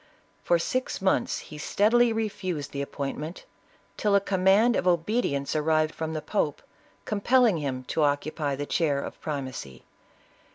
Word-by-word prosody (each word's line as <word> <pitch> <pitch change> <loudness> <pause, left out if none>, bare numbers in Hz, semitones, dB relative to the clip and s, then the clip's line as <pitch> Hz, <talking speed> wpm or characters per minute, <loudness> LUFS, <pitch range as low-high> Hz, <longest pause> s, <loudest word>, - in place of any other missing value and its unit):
For - - +3
six 255 - -2
months, 190 -1 +1
he 150 - -9
steadily 230 +8 +3
refused 190 -9 -3
the 140 - -3
appointment, 145 +4 -5 0.5
till 205 -1 +2
a - - +6
command 200 +4 +3
of - - 0
obedience 170 - +1
arrived 155 0 +2
from 160 0 -4
the 155 -1 -4
pope, 150 -4 -1 0.4
compelling 225 0 +3
him 135 -4 -3
to 160 - 0
occupy 145 0 0
the 145 +1 -4
chair 145 -3 +1
of - - -7
primacy. 130 - -5
160 Hz, 140 wpm, -27 LUFS, 145-205 Hz, 0.5 s, a